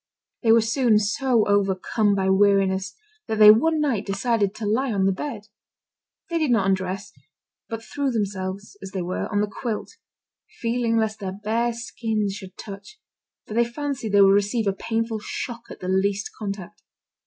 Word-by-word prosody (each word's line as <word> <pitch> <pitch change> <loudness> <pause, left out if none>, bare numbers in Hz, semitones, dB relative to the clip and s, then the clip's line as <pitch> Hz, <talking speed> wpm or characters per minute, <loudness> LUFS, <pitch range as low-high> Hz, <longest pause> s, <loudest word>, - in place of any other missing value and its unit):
They 225 - +4
were 230 0 +6
soon 230 0 +3
so 225 +2 +1
overcome 205 +1 +2
by 190 -1 0
weariness 195 -1 +2 0.3
that 220 - -2
they 210 0 +10
one 315 +9 +3
night 270 -9 0
decided 205 0 0
to 215 - -5
lie 240 +5 +1
on 195 -2 +1
the 195 - +4
bed. 220 +2 -5 0.9
They 335 - +1
did 310 -3 +1
not 225 -5 +3
undress, 190 0 -1 0.6
but 225 0 -5
threw 280 +4 -2
themselves, 200 -3 -3
as 190 -1 -8
they 190 -2 -2
were, 180 +5 -3
on 205 -1 +1
the 210 - 0
quilt, 230 -4 -4 0.6
fearing 230 -1 0
lest 220 -1 0
their 190 -2 -4
bare 230 +3 +1
skins 225 -3 -2
should 190 -2 -10
touch, 200 - -10 0.5
for - - -8
they 235 +2 +4
fancied 245 -3 -4
they 200 - +6
would 195 0 +7
receive 205 +3 +1
a 200 - +1
painful 225 +2 -2
shock 235 +2 -6
at - - -10
the 180 - -5
least 195 +2 0
contact. 200 -1 -6
210 Hz, 175 wpm, -24 LUFS, 195-230 Hz, 0.9 s, they